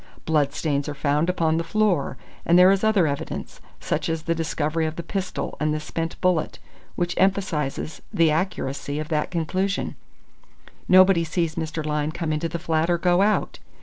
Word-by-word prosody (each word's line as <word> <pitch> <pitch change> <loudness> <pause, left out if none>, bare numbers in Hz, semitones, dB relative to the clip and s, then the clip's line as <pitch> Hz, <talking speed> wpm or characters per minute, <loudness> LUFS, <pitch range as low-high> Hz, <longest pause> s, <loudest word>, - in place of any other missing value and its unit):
Bloodstains 145 -1 0
are 145 - -5
found 145 +4 +1
upon 160 -3 +1
the 165 - 0
floor, 175 -7 0 0.3
and 170 - +4
there 180 +1 +8
is 195 +1 +1
other 215 -5 +4
evidence, 140 -2 -4 0.2
such - - -2
as 165 -1 -2
the 165 - 0
discovery 160 -1 -1
of 155 - -5
the 170 - -5
pistol 190 -1 -4
and 155 0 +1
the - - -2
spent 165 +1 -4
bullet, 180 -4 +1 0.4
which 175 0 -1
emphasises 175 -6 0
the 165 -2 +3
accuracy 150 -4 -2
of 155 +1 -4
that 150 -2 0
conclusion. 185 +4 -1 0.9
Nobody 185 -2 +6
sees 165 0 -1
Mr. 160 -1 -4
Lyne 150 0 -1
come 160 -1 -2
into 155 +2 -2
the 170 - -3
flat 160 0 0
or 175 - +3
go 175 +1 +3
out. 210 +1 +1
165 Hz, 175 wpm, -24 LUFS, 155-180 Hz, 0.9 s, there